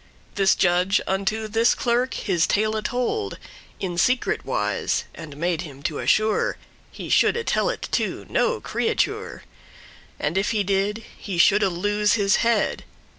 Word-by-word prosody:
This 195 -1 +3
judge 180 +2 +2
unto 200 +3 -1
this 225 +2 +2
clerk 245 +1 0
his 180 -6 0
tale 215 +1 +1
told 250 - -2 0.4
In 175 -3 -3
secret 250 +6 +1
wise, - - -1
and 155 -4 -10
made 170 +1 -1
him 140 -5 -10
to 150 - -2
assure 215 0 +1 0.3
He - - -8
shoulde 465 -1 +2
tell - - +1
it - - -4
to - - -1
no 485 -1 +1
creature, 450 - -2 0.8
And 165 +6 0
if 200 - 0
he 215 -3 +1
did, 200 +3 -1
he 195 -4 -6
shoulde 195 +4 +5
lose 205 +4 +1
his 200 -2 +3
head. 230 -2 +1
205 Hz, 145 wpm, -23 LUFS, 180-230 Hz, 0.8 s, shoulde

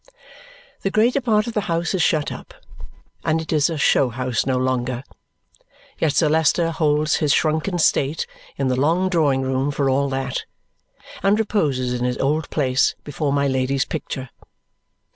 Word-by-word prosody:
The 195 - 0
greater 235 +7 +2
part 215 -4 +2
of 235 - -5
the 210 - 0
house 170 +2 0
is 190 - 0
shut 155 -2 +1
up, - - -10 0.7
and 160 0 +1
it 160 0 -4
is 150 0 +3
a 165 - -3
show 135 -2 +3
house 125 0 -2
no 130 -1 +1
longer; 130 -1 -1 1.0
yet 155 -2 +1
Sir 160 - +3
Leicester 160 +2 +2
holds 155 -1 +1
his 150 -2 +1
shrunken 160 +5 +1
state 150 -2 +1 0.3
in 135 - 0
the 130 - +1
long 165 +8 +1
drawing 145 -7 +2
room 130 +1 0
for 140 -1 0
all 140 +1 +1
that, 135 -1 -3 0.8
and 200 +2 +3
reposes 145 - 0
in 125 0 -2
his 125 0 -1
old 150 +3 0
place 130 -3 +1
before 145 0 -2
my 140 0 +1
Lady's 130 0 0
picture. 130 -2 -5
145 Hz, 165 wpm, -21 LUFS, 130-165 Hz, 1.0 s, is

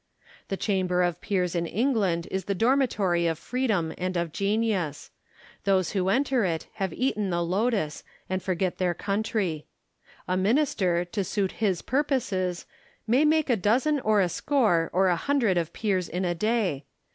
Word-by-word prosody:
The 195 - -3
Chamber 185 -3 +1
of 175 -2 -1
Peers 180 -4 0
in 170 -1 -1
England 200 -6 0
is 190 -1 -2
the 200 - -1
dormitory 210 -8 +2
of 165 -1 -1
freedom 210 -6 -1
and 185 0 -1
of 170 -2 -1
genius. 200 -6 -1 0.5
Those 190 -3 +2
who 190 -2 0
enter 260 +2 +2
it 165 -4 -1
have 190 -3 -1
eaten 215 -3 -1
the 170 -1 0
lotus, 195 -3 -1 0.2
and 185 0 -2
forget 185 -1 -1
their 180 -2 +1
country. 195 -5 -2 0.6
A 185 - 0
minister, 190 - +1
to 195 +3 -3
suit 195 0 -1
his 190 -5 +1
purposes, 220 - -1 0.4
may 245 +6 +3
make 310 0 +3
a - - +4
dozen 255 +9 +2
or 215 -4 +3
a 180 - +1
score 195 - +1
or 190 +2 +3
a 180 - +3
hundred 235 -1 +1
of 170 -2 -1
peers 190 -5 -1
in 180 +3 -2
a 175 - +1
day. 195 - 0
190 Hz, 165 wpm, -26 LUFS, 175-225 Hz, 0.6 s, a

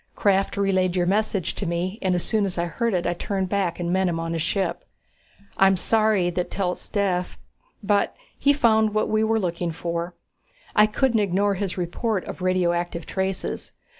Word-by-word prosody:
Krafft 195 -1 +2
relayed 190 -2 +1
your 180 -1 +2
message 200 -1 0
to 200 - -4
me 180 +5 -2
and 185 -2 +1
as 175 - -1
soon 220 -2 +1
as 190 -3 -2
I 170 - +1
heard 215 +6 -1
it 175 - -1
I - - +1
turned 190 +1 -2
back 190 -4 -1
and 175 0 -1
met 190 0 +2
him 165 -2 -1
on 165 0 -3
his 165 - -1
ship. 195 +4 -1 0.7
I'm 195 0 +5
sorry 215 -2 +3
that 180 0 -2
Telt's 180 -2 -3
dead 185 -4 0 0.6
but 205 0 +1 0.2
he 285 - +3
found 220 -6 +3
what 215 - +1
we 215 0 +2
were 225 0 +2
looking 175 -2 -2
for. 170 +1 -4 0.6
I 210 0 +6
couldn't 235 +1 +1
ignore 200 0 +2
his 195 -1 -3
report 185 +3 -1
of - - -7
radioactive 175 -2 0
traces. 190 0 -3
190 Hz, 185 wpm, -24 LUFS, 175-210 Hz, 0.7 s, I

